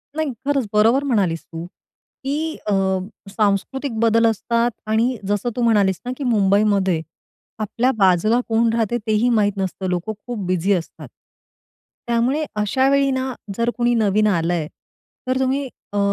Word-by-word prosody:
नाही 315 -3 -1
खरंच, 275 -5 +1
बरोबर 225 +6 +4
म्हणालीस 195 - 0
तू 165 0 -7 0.6
की 305 +4 -2
अ, 205 - +2 0.6
सांस्कृतिक 215 +7 -1
बदल 230 0 +3
असतात 230 +2 +1 0.2
आणि 230 +3 +1
जसं, 205 +4 0
तू 245 - -2
म्हणालीस 205 -5 +3
ना 250 - -2
की 285 - -4
मुंबईमध्ये, 200 -5 +2 0.6
आपल्या 230 +4 0
बाजूला 195 +4 +3
कोण 230 +1 +3
राहते 230 +1 0
तेही 220 +3 +2
माहीत 210 -3 +3
नसतं. 190 0 -3
लोकं 180 +4 -2
खूप 240 -3 -4
बिझी 185 +2 +1
असतात. 170 -3 -4 1.0
त्यामुळे 240 +6 +1
अशावेळी 270 +6 +2
ना, 260 0 -2 0.2
जर 235 0 +1
कुणी 240 0 +2
नवीन 215 -1 +2
आलंय, 170 -4 0 0.6
तर 260 +1 +1
तुम्ही 265 +1 0 0.3
अ, - - -1
225 Hz, 140 wpm, -21 LUFS, 200-250 Hz, 1.0 s, बरोबर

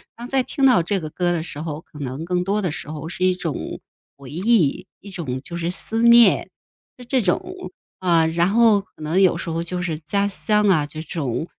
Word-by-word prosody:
当 240 +1 -8
再 265 +1 +2
听 270 +2 -1
到 250 -9 +5
这 190 +3 -1
个 155 -2 -7
歌 175 +1 0
的 165 -2 -1
时 150 -3 -6
候， 155 -1 -5
可 150 - -15
能 135 +3 -5
更 180 0 0
多 205 +2 -1
的 180 - 0
时 150 - -6
候 155 0 -6
是 180 - -4
一 185 0 +3
种 165 -6 -5 0.4
回 140 -1 -12
忆， 190 -2 +1
一 200 - -11
种 140 -9 -4
就 170 - -8
是 170 0 -2
思 225 +4 -1
念， 235 0 +6 0.5
是 250 - -12
这 260 +1 +1
种。 360 - -3 0.3
啊， 170 -3 +3
然 170 +2 +1
后 220 0 +4
可 195 -5 -15
能 160 +5 +1
有 185 - +4
时 - - -5
候 165 +1 -2
就 180 +1 -4
是 160 -4 -3
家 200 +6 0
乡 210 +1 +2
啊， 155 -6 +3
这 155 +1 -8
种， 150 -4 -3
180 Hz, 240 characters per minute, -21 LUFS, 160-205 Hz, 0.5 s, 念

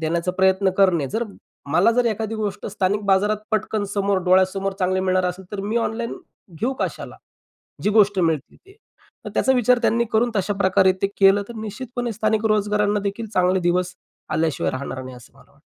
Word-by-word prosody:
देण्याचा 170 +3 -1
प्रयत्न 190 +1 +2
करणे. 185 -7 +3
जर 230 +2 0 0.5
मला 180 +8 +4
जर 245 +1 +2
एखादी 220 0 -2
गोष्ट 210 -2 -4
स्थानिक 200 0 -1
बाजारात 200 +2 +3 0.2
पटकन 215 0 0
समोर 200 -1 +1
डोळ्यासमोर 190 +1 +2
चांगले 185 0 +1
मिळणार 185 -1 +1
असेल 180 +1 -5
तर 205 - -3
मी 210 +4 -2
ऑनलाईन 230 0 -2 0.5
घेऊ 255 +3 0
कशाला? - - -4 0.7
जी 210 - +2
गोष्ट 205 -2 +4
मिळतील 160 -5 -1
ते. 390 +1 -18 0.5
तर - - -6
त्याचा 265 - +3
विचार 250 -1 +3
त्यांनी 235 +1 +2
करून 235 +2 +2
तशाप्रकारे 190 -1 +2
ते - - +4
केलं 195 +1 +6
तर 235 - -8
निश्चितपणे 235 +2 -5
स्थानिक 215 +1 0
रोजगारांना 210 -1 +1
देखील 225 +3 -6
चांगले 185 +1 +2
दिवस 180 +1 0 0.4
आल्याशिवाय 155 -2 0
राहणार 130 0 -5
नाही, 130 -1 -9
असं 125 - -16
मला - - -21
वाटतं. - - -28
200 Hz, 175 wpm, -22 LUFS, 185-220 Hz, 0.7 s, केलं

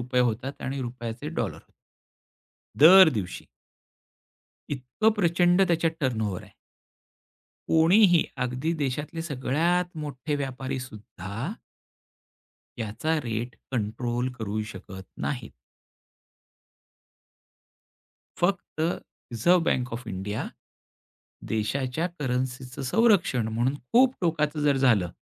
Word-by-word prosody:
रुपये 125 +1 0
होतात 130 +5 -6
आणि 135 +1 -3
रुपयाचे 120 +2 -5
डॉलर 120 - -2
होतात. - - -17 1.1
दर 180 +3 +9
दिवशी. 100 - -4 1.2
इतकं 135 - +1
प्रचंड 175 0 +3
त्याच्यात 165 -1 +2
टर्न 130 -6 0
ओव्हर 95 -3 -5
आहे. - - -15 1.2
कोणीही, 175 +2 +5 0.2
अगदी 125 +6 -1
देशातले 145 +4 -2
सगळ्यात 165 +6 0
मोठे 145 0 -4
व्यापारीसुद्धा 130 - -5 1.3
याचा 115 +9 -1
रेट 115 +1 -3 0.2
कंट्रोल 120 +2 -1
करू 110 -1 -2
शकत 95 0 -9 0.2
नाहीत. 125 -6 -3 2.9
फक्त 185 +2 +2 0.2
रिझर्व्ह 165 -1 0
बँक 125 -7 0
ऑफ 120 +2 -6
इंडिया 95 +3 -3 1.0
देशाच्या 125 +8 -1
करन्सीचं 130 0 -3
संरक्षण 180 - +3
म्हणून, 120 +5 0 0.2
खूप 255 +2 +5
टोकाचं 155 -3 0
जर 145 -2 +3
झालं 115 -10 +3
130 Hz, 95 wpm, -26 LUFS, 115-160 Hz, 2.9 s, दर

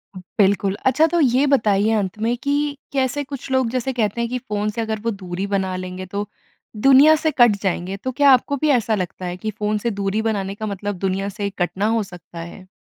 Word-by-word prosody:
बिल्कुल। 195 0 +1
अच्छा 305 +5 +4
तो 345 +1 0
ये 260 +1 +3
बताइए 215 -6 +3
अंत 200 -2 -1
में 230 +2 +1
कि 285 0 0 0.2
कैसे 270 +2 0
कुछ 275 -1 -8
लोग 260 -3 +2
जैसे 255 +1 -2
कहते 230 -1 -1
हैं, 235 - -1
कि 250 - -2
फ़ोन 210 -3 -2
से 230 +2 -3
अगर 220 -1 -2
वो 230 +1 -1
दूरी 190 -1 -5
बना 190 -2 -1
लेंगे 185 0 -6
तो 200 +2 -4 0.6
दुनिया 280 +4 +8
से 315 0 0
कट 240 -4 +6
जाएँगे। 190 0 -2
तो 260 +6 -4
क्या 280 +1 +5
आपको 260 +2 +3
भी 305 - +2
ऐसा 230 -5 +2
लगता 185 -1 -4
है, 180 0 -4
कि 215 +3 -4
फ़ोन 210 0 -1
से 235 +3 -2
दूरी 200 +1 -1
बनाने 200 -3 -2
का 215 - -5
मतलब 205 -1 -4
दुनिया 195 +1 -1
से 200 0 -3
कटना 185 +3 -1
हो 225 -1 +1
सकता 175 -3 -11
है? 170 +3 -9
210 Hz, 220 wpm, -21 LUFS, 195-255 Hz, 0.6 s, दुनिया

